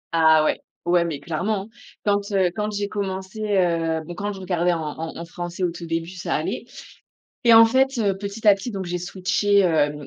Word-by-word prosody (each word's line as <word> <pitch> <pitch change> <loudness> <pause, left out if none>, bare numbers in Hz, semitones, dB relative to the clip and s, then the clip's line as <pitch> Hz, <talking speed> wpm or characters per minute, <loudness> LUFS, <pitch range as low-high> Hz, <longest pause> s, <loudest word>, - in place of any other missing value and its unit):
Ah 160 -1 +5
ouais! - - 0 0.2
Ouais, 175 0 +3
mais 150 -4 -4
clairement! 195 +5 -2 0.4
Quand, 205 0 +2
heu, 185 -2 +3
quand 210 0 -1
j'ai 205 0 -2
commencé 190 0 -4 0.2
heu 165 -3 +1
bon 175 - -7
quand 205 +4 -3
je 195 - -9
regardais 180 -1 +1
en 165 - -2
en 160 +2 -6
en 170 - -6
français 175 +2 -6
au 175 - +1
tout 170 0 -8
début, 165 +1 -2
ça 185 -1 -3
allait. - - -3 0.8
Et 230 -1 +7
en 225 - +10
fait, 265 +3 +2
heu, 200 -3 +1
petit 205 +2 -6
à 200 - +9
petit 240 +5 -6
donc, 190 -1 -4
j'ai 175 0 -3
switché, 190 +3 +1
hem, 150 -5 +1
185 Hz, 210 wpm, -23 LUFS, 170-205 Hz, 0.8 s, en